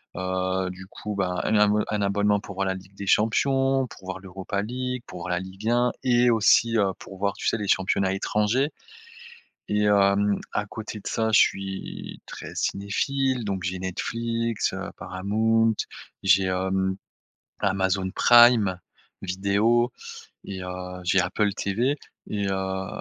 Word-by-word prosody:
heu, 95 0 -1
du 95 0 -10
coup 105 +1 -6
bah 90 -2 -1
un 110 - +2
abonne 105 0 +4
un 105 -1 -1
abonnement 105 +1 +2
pour 100 - -9
voir 95 0 -1
la 95 - 0
Ligue 95 +1 -12
des 100 0 -7
Champions, 135 +5 +2
pour 95 - -14
voir 95 0 -5
l'Europa 95 +1 -4
League, 125 +3 -3
pour 90 - -8
voir 90 - -5
la 90 - +1
Ligue 95 +4 -5
1 120 +1 +3
et 120 -1 +4
aussi, 115 +1 +4
heu, 100 -3 +2
pour 95 - -11
voir, 100 +1 0
tu - - -3
sais? - - +2
Les 105 -2 -4
championnats 95 0 +2
étrangers, 105 +8 +1 1.0
et 105 0 +1
hem, 100 0 +3
à 105 - 0
côté 110 0 -7
de - - -9
ça, 110 0 0
je - - +7
suis 95 0 -2
très - - -8
cinéphile, 130 +6 -1
donc 95 -2 -3
j'ai 90 +1 -2
Netflix, 115 +5 -2
heu, - - -5
Paramount, 110 +4 +1 0.5
j'ai, 95 0 +5
hem, 95 +1 0 0.7
Amazon 95 -1 +1
Prime 120 -6 +6 0.4
Vidéo 100 +6 +2 0.6
et 95 -2 -6
heu, 90 0 -6
j'ai 90 +2 +3
Apple 100 +3 0
TV, 120 +11 0 0.3
et 100 -1 -1
heu, 95 0 -2
100 Hz, 155 wpm, -25 LUFS, 95-115 Hz, 1.0 s, je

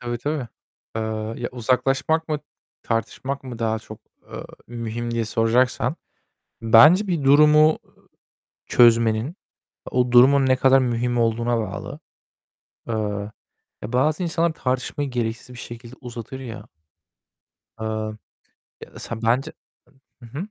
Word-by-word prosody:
Tabii 120 -1 -4
tabii. 145 -3 -3 0.5
Eee, 110 - -1 0.4
ya - - -1
uzaklaşmak 135 +6 0
mı, 150 - -1 0.4
tartışmak 130 +4 -3
mı 125 -3 -7
daha 110 -1 0
çok, 110 0 -12 0.3
eee, - - -6 0.2
mühim 120 0 -5
diye 115 -1 -1
soracaksan, 120 +5 +1 0.7
bence 155 - +7
bir 165 -6 -1
durumu 150 +2 +6 0.9
çözmenin, 115 - +3 0.6
o 125 -1 +1
durumun 135 +3 +6
ne 130 - +4
kadar 135 +1 +4
mühim 120 -1 -1
olduğuna 115 +1 +1
bağlı. 100 -3 -6 0.9
Eee, 115 - -1 0.9
ya, 115 +4 -6
bazı 155 +7 +1
insanlar 165 0 0
tartışmayı 130 +1 -2
gereksiz 120 0 -3
bir 120 - -10
şekilde 120 +1 -10
uzatır 120 +1 -8
ya. 115 -4 -8 1.1
Eee, 110 - -3 1.0
ya - - -22
da - - -10
sen, 115 -1 -7
bence 130 +7 +1 0.7
Hı 115 - -11
hı. 140 - -10
125 Hz, 125 wpm, -23 LUFS, 115-135 Hz, 1.1 s, bence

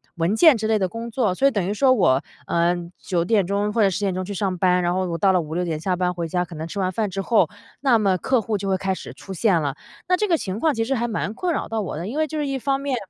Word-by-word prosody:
文 170 +5 0
件 310 +5 +7
之 220 -1 -2
类 220 - +3
的 190 -3 0
工 230 +4 -6
作， 225 -5 0
所 270 +9 +3
以 275 - +3
等 195 -5 -1
于 205 - -1
说 260 +5 +3
我， 145 - +3 0.2
呃 170 +1 +2 0.2
9 170 -2 -1
点 200 -2 +2
钟 205 +2 0
或 230 - +2
者 195 - +5
10 185 - -3
点 195 -2 0
钟 185 +1 -2
去 200 - -7
上 190 -1 -1
班， 180 -1 +3
然 175 0 +1
后 185 0 0
我 165 - -2
到 195 +1 +3
了 180 - +3
5、6 160 +3 -3
点 160 -2 -2
下 180 +2 -1
班 180 0 0
回 170 -1 -3
家， 180 +2 -1
可 170 - -12
能 160 +1 -5
吃 185 - -8
完 185 -1 0
饭 210 +2 -1
之 195 - -5
后， 230 +1 +3 0.3
那 260 -5 +4
么 195 -4 +2
客 255 +9 +2
户 220 0 -2
就 195 0 -4
会 190 - +2
开 190 0 -1
始 - - -8
出 195 - -9
现 190 -1 +2
了。 140 -3 -2 0.3
那 365 - +4
这 420 +3 0
个 335 -4 +3
情 195 -2 -4
况 310 0 +2
其 225 0 0
实 270 - 0
还 240 -1 0
蛮 215 -2 -3
困 355 +9 -2
扰 - - -2
到 225 -1 -2
我 180 - -4
的， 170 +4 -4
因 275 +7 -3
为 315 - +2
就 310 +1 -5
是 295 - -1
一 270 -1 -2
方 275 +1 0
面， 275 -2 -1
200 Hz, 330 characters per minute, -23 LUFS, 180-230 Hz, 0.3 s, 件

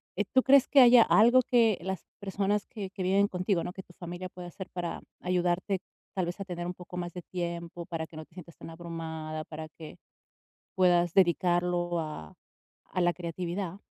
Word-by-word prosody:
Eh, 205 - 0
¿tú 260 - +4
crees 275 0 +6
que 285 - +5
haya 245 -1 +9
algo 240 +4 +6
que 230 -5 +3
las 190 -1 -4
personas 200 +1 -1
que 200 -5 -6
que 190 -2 -5
viven 200 +2 +3
contigo, 180 -1 0
¿no?, 180 - -5
que 190 - -7
tu 175 - -19
familia 175 +1 -7
pueda 180 0 -9
hacer 185 +2 -8
para 175 -2 -4 0.2
ayudarte, 180 +1 0 0.3
tal 185 -2 0
vez 175 - -5
a 195 - -4
tener 175 -1 -5
un 180 - -3
poco 180 0 -9
más 175 -1 -4
de 180 -2 -7
tiempo, 170 -1 -5
para 165 -2 -3
que 160 - -16
no 155 - -6
te 165 - -28
sientas 170 -2 -11
tan - - -9
abrumada, 160 -2 -6
para 155 0 -7
que 155 0 -11 0.8
puedas 175 -2 +3
dedicarlo 175 -1 +2
a 150 - -7 0.6
a 185 - -2
la 175 0 +3
creatividad? 175 +2 -4
180 Hz, 195 wpm, -29 LUFS, 170-195 Hz, 0.8 s, haya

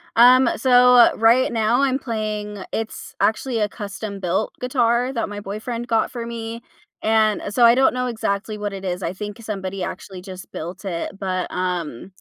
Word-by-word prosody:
Um, 250 +2 +7
so, 250 -1 +6
right 230 +4 +4
now, 230 +2 +2
I'm 265 -1 +1
playing 215 -4 -4
it's, 225 0 -5
actually, 230 +2 +1
a 210 -1 +1
custom 200 -1 -6
built 185 +3 -1
guitar 250 0 +1
that 230 -4 -2
my 205 0 -6
boyfriend 220 +4 -5
got 225 -2 +1
for 235 -2 -5
me, 230 0 -6 0.4
and 220 -1 +2
so 240 +4 +2
I 235 +1 +7
don't 265 +1 +4
know 250 0 -1
exactly 215 -2 -2
what 205 -1 -4
it 195 -1 -7
is. 180 0 -3
I 170 - -2
think 210 +1 -7
somebody 195 -3 -4
actually 185 +1 -7
just 185 -1 -10
built 175 +5 -7
it, 185 +1 -4
but, 185 -2 -2
um, 180 -4 -3
215 Hz, 175 wpm, -22 LUFS, 195-235 Hz, 0.4 s, Um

